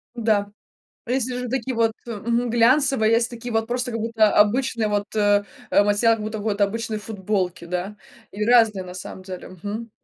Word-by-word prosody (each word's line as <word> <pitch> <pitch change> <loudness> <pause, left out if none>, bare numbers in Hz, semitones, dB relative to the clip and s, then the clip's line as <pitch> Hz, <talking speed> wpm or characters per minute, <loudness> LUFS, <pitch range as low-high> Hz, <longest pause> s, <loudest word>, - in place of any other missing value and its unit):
Да, 215 -3 +1 0.6
а - - -7
если 255 -1 0
же 250 -1 -4
такие 255 0 -2
вот, 225 -1 +2
э, 235 - -5
мгм, 235 +3 -1
глянцевые, 240 -1 +3
есть 235 +1 +3
такие 240 0 -7
вот 225 0 0
просто, 245 +1 -2
как 230 -1 -3
будто, 220 -1 +2
обычный 230 +2 +2
вот, 205 -1 0
э, 205 -1 +3 0.3
э, - - +5
материал, 205 +3 +3
как 220 - -6
будто 215 0 -4
вот 205 -1 -2
обычной 220 +2 0
футболки, 195 -4 -3
да, 180 +4 -4 0.3
и 210 +2 -3
разные, 225 -5 +4
на 180 0 -9
самом 185 0 -8
деле. 185 -1 -8
Мгм. 220 +3 -5
220 Hz, 190 wpm, -23 LUFS, 205-235 Hz, 0.6 s, э